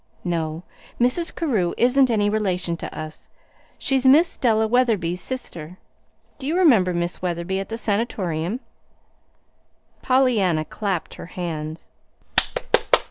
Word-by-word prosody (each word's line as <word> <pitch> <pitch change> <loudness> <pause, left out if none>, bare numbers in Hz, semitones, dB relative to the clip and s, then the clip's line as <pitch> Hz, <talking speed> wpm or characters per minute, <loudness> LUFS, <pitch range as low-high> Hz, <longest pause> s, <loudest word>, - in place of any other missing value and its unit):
No, 165 -2 -2 0.4
Mrs. 250 +8 +2
Carew 220 - 0
isn't 255 +2 +4
any 210 -3 +2
relation 185 -5 0
to - - -7
us. 155 0 -8 0.5
She's 265 -1 0
Miss 300 +6 +5
Della 220 -3 +2
Wetherby's 215 -8 +1
sister. 180 -10 -5 0.6
Do 270 - -5
you 325 +4 0
remember 235 - +5
Miss 175 0 -2
Wetherby 180 +1 -2
at 195 - -5
the 225 - -4
Sanatorium?" 200 - -1 1.4
Pollyanna 220 -12 +2
clapped 195 -3 -3
her - - -9
hands. 160 -3 -5
200 Hz, 115 wpm, -23 LUFS, 170-250 Hz, 1.4 s, Miss